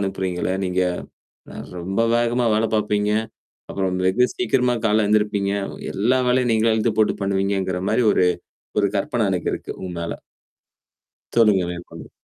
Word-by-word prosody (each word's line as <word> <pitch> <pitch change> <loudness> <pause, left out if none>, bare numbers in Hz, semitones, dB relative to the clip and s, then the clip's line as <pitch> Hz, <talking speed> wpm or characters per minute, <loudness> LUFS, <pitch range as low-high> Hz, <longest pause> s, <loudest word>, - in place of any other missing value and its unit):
அனுப்புறீங்கள? 95 -2 -2
நீங்க. 90 0 0 0.7
அ - - -10 0.3
ரொம்ப 95 +5 -2 0.2
வேகமா 120 +1 +1
வேல 110 +1 +2
பார்ப்பீங்க. 105 -1 +1 0.6
அப்புறம் 95 -1 -1
வெகு 100 +7 +3
சீக்கிரமா 125 -9 +1
கால 110 0 +3
எழுந்திருப்பீங்க. 105 -1 +1 0.4
எல்லா 120 +6 +2
வேலையும் 125 -1 +2
நீங்கள 110 0 +3
எழுத்து 110 0 +1
போட்டு 110 - +3
பண்ணுவீங்கங்கிறமாரி 95 +2 0
ஒரு, 90 - +3 0.5
ஒரு 100 - +3
கற்பன 105 +1 0
எனக்கு 90 -2 -1
இருக்கு - - -6
உங் 90 -2 -6
மேல. 85 - -5 1.1
சொல்லுங்க 105 -5 +4
மேற்கொண்டு. 85 0 -10
105 Hz, 130 wpm, -22 LUFS, 95-115 Hz, 1.1 s, சொல்லுங்க